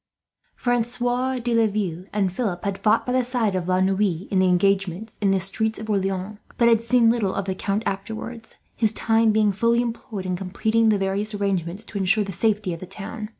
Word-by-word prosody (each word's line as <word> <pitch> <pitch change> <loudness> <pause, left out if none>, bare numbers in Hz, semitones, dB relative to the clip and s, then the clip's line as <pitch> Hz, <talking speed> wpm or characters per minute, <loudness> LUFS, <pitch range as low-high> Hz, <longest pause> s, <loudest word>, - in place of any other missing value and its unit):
Francois 245 +2 0
de 240 -1 -2
Laville 205 -6 0
and 195 -3 0
Philip 190 -5 -2
had 200 -1 -2
fought 210 - +2
by 250 - -1
the 255 0 +2
side 240 -4 0
of 180 -2 -2
La 185 0 +2
Noue, 190 -2 +1
in 190 - +2
the 185 - +4
engagement 195 +2 +1
in 200 - +3
the 195 0 +3
streets 220 +4 -1
of 220 0 -5
Orleans; 195 +1 -2 0.2
but 235 - +4
had 230 -1 +4
seen 230 -1 +4
little 215 -5 0
of 195 - -2
the 190 - -1
Count 200 +3 -2
afterwards, 220 +3 -5 0.2
his 220 -2 +2
time 225 0 +2
being 215 -1 +3
fully 230 +4 +2
employed 230 -4 -4
in 185 -1 -1
completing 220 +5 +1
the 210 - +3
various 200 +2 -2
arrangements 195 -1 -2
to 210 -2 -6
ensure 195 +3 +3
the 195 - -5
safety 210 -1 0
of 165 - -7
the 185 - -8
town. 210 +3 -7
210 Hz, 205 wpm, -23 LUFS, 190-225 Hz, 0.2 s, the